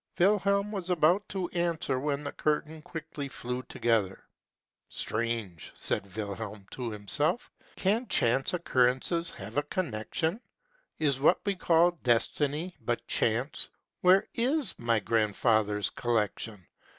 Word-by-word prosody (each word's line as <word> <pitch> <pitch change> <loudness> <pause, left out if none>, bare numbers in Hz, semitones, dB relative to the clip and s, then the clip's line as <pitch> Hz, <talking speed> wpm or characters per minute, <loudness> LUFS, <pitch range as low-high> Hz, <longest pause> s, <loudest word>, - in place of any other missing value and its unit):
' - - -59
' - - -30
Wilhelm 200 +2 +3
was 190 -4 -4
about 180 +3 +3
to 190 -3 -2
answer, 170 -6 0
when 145 +1 -1
the 145 - -4
curtain 155 +1 -1
quickly 155 -3 -6
flew 125 -1 -4
together. 110 -6 0 0.4
" - - -64 0.2
Strange! 110 -7 -3
" - - -30
said 100 -1 0
Wilhelm 105 -1 -5
to 125 -2 -4
himself: 115 - -1
" - - -27
can 220 +6 +1
chance 130 - +2
occurrences 165 +2 +1
have 105 +6 -7
a - - +5
connection? 160 - -1 0.6
Is 140 -4 +1
what 145 - +5
we 200 - +2
call 175 -1 +4
Destiny 145 +8 +1
but 120 +1 -2
Chance? 120 +6 0 0.3
Where 185 +2 +5
is 270 +5 0
my 115 -1 +2
grandfather's 105 0 +1
collection? 110 -4 -1
140 Hz, 140 wpm, -29 LUFS, 115-175 Hz, 0.6 s, a